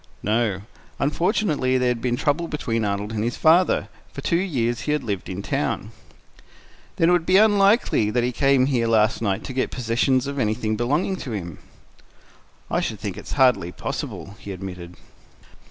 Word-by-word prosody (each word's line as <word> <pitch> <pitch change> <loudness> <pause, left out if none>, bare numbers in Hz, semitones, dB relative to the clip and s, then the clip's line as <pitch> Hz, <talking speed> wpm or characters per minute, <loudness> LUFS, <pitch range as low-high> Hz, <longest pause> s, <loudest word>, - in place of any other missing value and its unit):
"No. 105 -3 0 0.4
Unfortunately, 150 - +1
there 125 -1 +2
had 120 -2 -1
been 120 0 0
trouble 150 +4 0
between 115 -8 -2
Arnold 100 +1 -2
and 110 -1 -2
his 120 +1 -2
father. 170 +3 +4 0.2
For - - -7
two 170 - 0
years 120 -11 -1
he 150 - -1
had 150 -2 -1
lived 100 -6 -4
in 95 +1 -5
town." - - -2 1.0
"Then 165 - +3
it - - +4
would 175 -2 +3
be 185 - +5
unlikely 205 - +4
that 120 +2 0
he 125 - 0
came 135 0 +3
here 125 -4 +1
last 110 -1 +2
night 100 -4 -1
to 130 - -6
get 130 - 0
possession 125 +2 +1
of 140 0 -4
anything 110 -1 0
belonging 150 - 0
to 125 - -6
him?" 85 -6 -6 1.1
"I - - +1
should - - -3
think - - -4
it - - -10
hardly 125 -10 +3
possible," 100 +2 -6
he 100 - -8
admitted. 90 -2 -8
125 Hz, 175 wpm, -23 LUFS, 105-150 Hz, 1.1 s, be